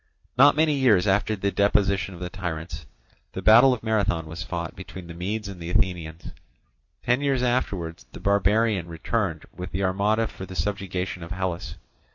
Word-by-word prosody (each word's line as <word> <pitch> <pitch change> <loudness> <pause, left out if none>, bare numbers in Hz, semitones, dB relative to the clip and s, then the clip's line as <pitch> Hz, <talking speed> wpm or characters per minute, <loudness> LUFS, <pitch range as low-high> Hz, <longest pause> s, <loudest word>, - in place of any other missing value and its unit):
Not 140 +4 +7
many 155 0 +3
years 120 -10 +4
after 105 +2 +2
the 100 0 -1
deposition 100 -2 +1
of - - -11
the 90 -1 -4
tyrants, 80 -4 -5 0.5
the - - -4
battle 120 +5 +8
of 125 -4 -2
Marathon 100 -7 0
was 80 +1 -7
fought 85 -1 -4
between 95 -1 -9
the 85 - -9
Medes 100 +5 -3
and 95 -3 -8
the 85 - -5
Athenians. 85 -3 -1 0.7
Ten 125 +3 +2
years 135 -3 +1
afterwards, 90 - -1
the - - -10
barbarian 100 -1 +2
returned 85 0 -2
with 90 0 -6
the 95 +2 -2
armada 100 +4 +1
for 95 -3 -8
the 95 - -9
subjugation 95 -2 -3
of 85 - -8
Hellas. 90 -1 -3
95 Hz, 175 wpm, -25 LUFS, 85-110 Hz, 0.7 s, battle